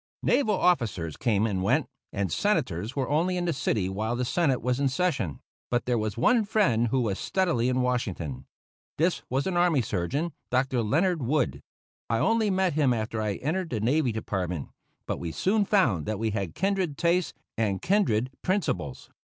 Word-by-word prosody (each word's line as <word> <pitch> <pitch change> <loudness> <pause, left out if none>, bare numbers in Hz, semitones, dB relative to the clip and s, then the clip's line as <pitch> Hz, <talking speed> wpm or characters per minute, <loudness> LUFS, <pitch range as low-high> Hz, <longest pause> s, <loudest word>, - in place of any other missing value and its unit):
Naval 215 -7 +3
officers 110 - +1
came 110 -3 +1
and 100 -4 -1
went, 95 - +2 0.3
and 100 -3 -2
Senators 110 - 0
were 135 -3 -1
only 170 +5 +1
in 175 - -1
the 170 - +1
city 110 -8 0
while 110 +5 -2
the 125 +1 -1
Senate 135 -1 +1
was 125 +1 -1
in 140 -1 +2
session; 130 - -1 0.3
but 120 0 0
there 125 - +1
was 110 -2 -2
one 225 - +4
friend 130 - +2
who 130 +3 +1
was 105 -5 -1
steadily 170 -11 +1
in 130 0 +1
Washington. 90 - -2 0.5
This 170 +3 +1
was 135 +2 0
an 190 - -1
army 175 -7 +3
surgeon, 135 - -2 0.2
Dr. 130 -1 +1
Leonard 160 - +1
Wood. 135 +2 0 0.5
I 115 - +2
only 225 - +2
met 190 -3 +1
him 140 -5 +3
after 110 0 -2
I 105 -2 0
entered 165 - -2
the 115 - -2
navy 130 +4 +2
department, 90 -7 -3 0.4
but - - -3
we 85 -2 -4
soon 200 - +1
found 180 - +2
that 110 -1 -1
we 110 +1 -1
had 100 -6 -3
kindred 190 -6 0
tastes 170 +1 +1 0.2
and 105 -4 0
kindred 130 - +1
principles. 90 - -2
125 Hz, 180 wpm, -27 LUFS, 105-175 Hz, 0.5 s, one